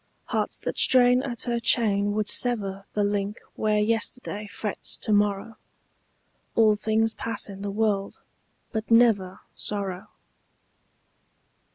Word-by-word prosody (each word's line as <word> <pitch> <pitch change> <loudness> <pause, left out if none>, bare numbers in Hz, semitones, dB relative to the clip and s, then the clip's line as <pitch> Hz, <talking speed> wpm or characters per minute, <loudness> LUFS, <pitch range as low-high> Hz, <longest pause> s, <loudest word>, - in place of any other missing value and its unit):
Hearts - - -1
that - - -4
strain 250 0 +5
at 245 -4 -5
her 240 -1 -1
chain 205 -3 +2
would 215 0 -1
sever 200 -5 +1
The 210 - +1
link 205 +1 -1
where 215 -1 0
yesterday 215 0 -1
frets 205 0 -4
to 215 - -1
morrow: 205 +1 0 1.0
All 215 -2 +5
things 220 +1 +1
pass 230 - -3
in 195 -1 -9
the 205 - -3
world, 200 -1 -1 0.5
but 220 -1 -4
never 220 -6 +3
Sorrow. 195 -3 -3
210 Hz, 125 wpm, -25 LUFS, 200-230 Hz, 1.0 s, strain